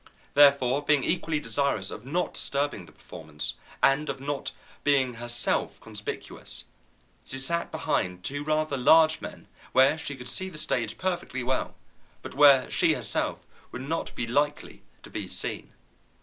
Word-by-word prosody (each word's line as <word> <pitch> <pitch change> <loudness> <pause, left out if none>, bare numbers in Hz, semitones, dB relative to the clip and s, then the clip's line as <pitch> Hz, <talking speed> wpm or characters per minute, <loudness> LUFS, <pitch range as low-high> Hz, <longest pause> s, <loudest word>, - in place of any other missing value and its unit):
Therefore, 140 -2 +5
being 145 -3 +3
equally 160 -4 0
desirous 140 -10 0
of 110 +4 -9
not 175 +6 -1
disturbing 140 -10 -1
the - - -15
performance 75 - -6 0.3
and 135 +3 +3
of 135 - -3
not 140 +1 -3 0.3
being 135 -3 +3
herself 120 0 -1
conspicuous, - - -6 0.6
she 135 - -4
sat 170 +6 -1
behind 150 - -1
two 145 +6 -4
rather 155 -1 0
large 160 +5 +5
men, - - -9 0.3
where 135 +4 +5
she 145 - -5
could 125 -1 -8
see 190 0 -2
the 160 - -10
stage 115 -7 -1
perfectly 175 -9 -2
well, 130 +1 -1 0.5
but - - -7
where 140 -2 +7
she - - +3
herself - - -2 0.3
would 130 - -6
not 160 +4 -3
be 120 - -2
likely 145 +5 -1 0.2
to - - -12
be - - -4
seen. - - -5
140 Hz, 150 wpm, -27 LUFS, 125-155 Hz, 0.6 s, where